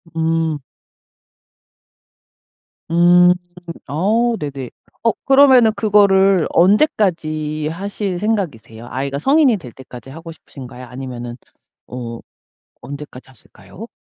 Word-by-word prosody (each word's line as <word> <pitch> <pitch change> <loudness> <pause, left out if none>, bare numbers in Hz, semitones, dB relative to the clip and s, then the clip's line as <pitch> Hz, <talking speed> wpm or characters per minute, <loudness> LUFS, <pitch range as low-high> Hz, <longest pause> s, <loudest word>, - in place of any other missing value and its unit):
음. 160 -2 -1 2.3
음. 175 +1 +5 0.6
어 220 - 0
네네. 140 -4 -6 0.3
어 230 - +2
그러면은 265 -5 +6
그거를 195 -4 +3
언제까지 165 - +1
하실 195 +2 -4
생각이세요? 150 - -4
아이가 140 +1 -3
성인이 275 - +3
될 125 -8 -12
때까지 130 0 -12
하고 165 +3 -10
싶으신가요? 130 -5 -12
아니면은 125 -1 -8 0.5
어 120 -2 -7 0.6
언제까지 140 -2 -10
하실까요? 175 - -14
165 Hz, 230 characters per minute, -18 LUFS, 135-205 Hz, 2.3 s, 그러면은